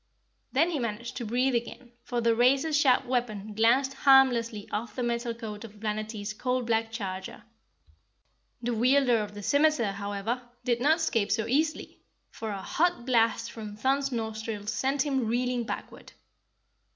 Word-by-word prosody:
Then 320 +6 +2
he 305 - -1
managed 235 0 -4
to 240 - -4
breathe 250 +4 +1
again, 240 +1 -4
for 240 -1 -3
the 230 0 +3
razor 265 +6 +3
sharp 275 -3 +4
weapon 220 -5 -2
glanced 240 +5 +3
harmlessly 245 -6 +4
off 220 +3 -4
the 250 - -2
metal 235 0 -1
coat 215 -2 -7
of 215 -2 -12
Planetty's 215 -1 -3
coal 250 +3 -1
black 225 -1 0
charger. 190 -4 -6 1.2
The 240 +1 0
wielder 250 +1 +3
of 205 -1 -5
the 205 - -7
scimiter, 285 -5 +3
however, 200 +4 -3 0.2
did 240 -2 +1
not 300 +4 +5
escape 230 -11 0
so 220 - +1
easily, 300 +6 -1 0.3
for 220 - -6
a 195 -2 -5
hot 345 - 0
blast 230 -2 +2
from 215 -2 -8
Thun's 270 +5 0
nostrils 220 -2 -4
sent 265 +5 0
him 265 -5 0
reeling 245 +1 0
backward. - - -7
235 Hz, 155 wpm, -28 LUFS, 215-260 Hz, 1.2 s, not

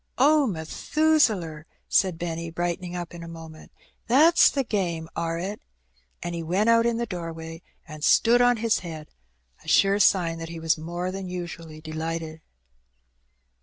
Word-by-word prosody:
"Oh, 290 +1 +4
Methusaler!" 185 - 0 0.2
said 185 -4 +2
Benny, 170 0 -4
brightening 175 +1 -3
up 175 -1 -6
in 170 - -9
a 170 - -8
moment, 160 -1 -11 0.4
"that's 310 +8 +6
the 275 - -1
game, 175 -8 -2
are 165 0 -2
it?" 195 +5 -5 0.6
and 175 0 -4
he 170 - -3
went 190 +8 +2
out 230 0 +4
in 235 -1 0
the 235 - -1
doorway 165 -3 -7 0.3
and 155 -2 -9
stood 240 +7 +5
on 245 -1 +4
his 225 0 +1
head 160 -4 -9 0.3
— 60 0 -30
^a - - -8
sure 195 +1 +4
sign 175 -4 +3
that 165 0 -6
he 165 0 -7
was 160 0 +1
more 175 +3 -4
than 190 -1 -6
usually 165 -3 -7
delighted. 160 0 -5
170 Hz, 165 wpm, -25 LUFS, 165-205 Hz, 0.6 s, that's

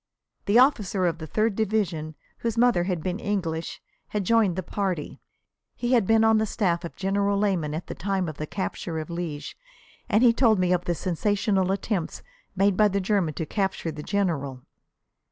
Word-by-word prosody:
The 205 +3 +4
officer 210 -8 +3
of 170 -1 0
the 160 - -6
Third 215 +4 0
Division, 190 -8 -1 0.2
whose 230 -1 -2
mother 235 -7 +3
had 180 -4 -2
been 185 +2 -2
English, 170 -6 -3 0.2
had 210 -1 -2
joined 215 -3 +3
the 185 - -3
party. 185 -5 -3 0.6
He 240 0 -2
had 230 -6 +3
been 225 0 +4
on 220 -1 +5
the 220 - 0
staff 180 -5 0
of 170 - -7
General 200 +1 0
Leman 180 -7 0
at 165 - -5
the - - -6
time 190 -1 -1
of 155 -2 -6
the 155 - -4
capture 175 -3 -4
of 155 +2 -5
Liège, 170 -4 -5 0.6
and 220 +1 +3
he 235 -2 +6
told 230 -3 +4
me 180 -1 +2
of 180 0 -1
the 175 - 0
sensational 190 +2 0
attempt 195 -3 -2 0.3
made 195 0 +3
by 210 +2 +5
the 200 0 0
Germans 185 -6 0
to 160 - -3
capture 190 -3 -2
the 150 -1 -7
General. 150 -9 -2
190 Hz, 190 wpm, -25 LUFS, 170-210 Hz, 0.6 s, he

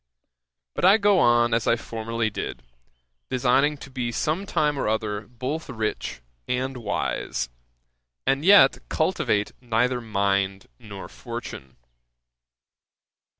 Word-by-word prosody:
But - - -4
I 190 +4 +7
go 205 -3 +4
on 120 -2 +4
as 115 0 +1
I - - +5
formerly 115 -1 -3
did, - - -5 0.7
designing 135 +4 +2
to 140 - -11
be 125 -2 -2
some 160 - -1
time 150 -4 +1
or - - -1
other 105 -1 -2
both 130 +7 -5
rich 110 - -3 0.3
and 130 +1 -1
wise; 100 - -2 0.8
and 135 +2 +1
yet 195 -7 +7
cultivate 155 - 0
neither 125 +1 +1
mind 100 -3 0
nor 100 -3 -9
fortune. 65 -1 -8
120 Hz, 115 wpm, -25 LUFS, 110-140 Hz, 0.8 s, I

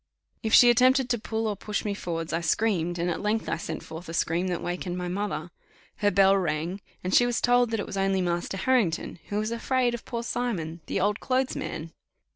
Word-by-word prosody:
If 220 - -2
she 245 -1 +8
attempted 255 +1 +4
to 240 - +1
pull 220 +1 -2
or 210 -2 0
push 210 +2 -3
me 205 - 0
forwards 165 -4 -4
I 165 - 0
screamed, 175 -1 +1
and 170 +1 -1
at 175 - -2
length 210 +1 0
I - - -1
sent 165 - -5
forth 160 +2 -9
a 165 - -4
scream 170 +3 0
that 175 -2 -1
wakened 175 0 -3
my 180 0 -3
mother 180 -3 -3 0.5
her 205 - +3
bell 195 0 +5
rang, 175 +1 -1 0.2
and 185 +1 -2
she 245 - +6
was 240 -1 0
told 245 -1 +3
that 225 -1 -1
it - - -2
was 195 - -6
only 195 0 +2
Master 175 +1 -1
Harrington, 195 -7 +1
who 205 - -1
was 215 +1 -1
afraid 245 +1 +1
of 240 - -5
poor 235 -1 -4
Simon, 185 -10 -3
the - - -1
old 205 +2 +1
clothes 260 0 0
man. 160 0 -5
200 Hz, 225 wpm, -27 LUFS, 175-230 Hz, 0.5 s, she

